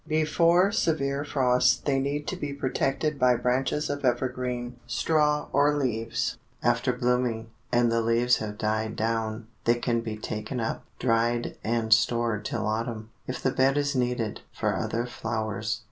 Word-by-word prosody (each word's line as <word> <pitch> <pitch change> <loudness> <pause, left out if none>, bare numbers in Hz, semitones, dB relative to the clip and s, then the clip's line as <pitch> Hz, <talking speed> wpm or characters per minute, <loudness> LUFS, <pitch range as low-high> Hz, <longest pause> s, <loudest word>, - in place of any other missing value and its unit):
Before 165 +4 +3
severe 140 -6 0
frost 125 -4 +2
they 135 -2 +2
need 145 +2 -2
to - - -3
be 145 -6 -4
protected 140 +2 -1
by 125 -1 +5
branches 130 +5 0
of 145 0 -3
evergreen, 125 -1 -1
straw 150 -2 +2
or 145 +1 +4
leaves. 115 -5 -1 0.2
After - - +2
blooming, 120 -2 0 0.2
and 120 -1 +3
the 115 0 +2
leaves 120 +2 +3
have 105 -1 -5
died 110 +1 -1
down, 110 0 -1 0.2
they 120 - +4
can 120 -1 0
be 110 -2 -5
taken 110 +3 -4
up, 115 - -2
dried 120 0 +1
and 110 0 +2
stored 110 -1 +1
till 110 -2 -2
autumn, 110 0 -3 0.2
if 130 - -5
the 130 - +2
bed 135 +2 +3
is 140 0 0
needed 125 -4 -1
for - - -1
other 115 +1 -1
flowers. 110 -2 -3
120 Hz, 155 wpm, -27 LUFS, 115-140 Hz, 0.2 s, by